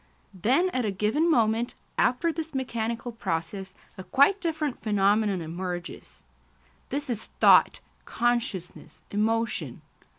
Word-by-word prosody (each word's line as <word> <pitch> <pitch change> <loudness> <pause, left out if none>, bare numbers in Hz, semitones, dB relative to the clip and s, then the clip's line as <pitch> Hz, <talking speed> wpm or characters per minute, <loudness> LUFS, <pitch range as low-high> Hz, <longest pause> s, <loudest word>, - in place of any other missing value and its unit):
Then 260 - +2
at 255 - -1
a 215 - 0
given 215 - +1
moment, 230 -3 +2 0.2
after 255 +7 +1
this 320 -2 -6
mechanical 235 -2 -3
process, 190 -2 -4 0.2
a - - -6
quite 285 - +3
different 310 -5 -2
phenomenon 205 -2 +2
emerges. 175 - -6 0.7
This 285 +2 -2
is 230 -4 -3
thought, - - +6 0.2
consciousness, 235 -7 -2
emotion. 225 +3 -1
225 Hz, 110 wpm, -27 LUFS, 195-265 Hz, 0.7 s, thought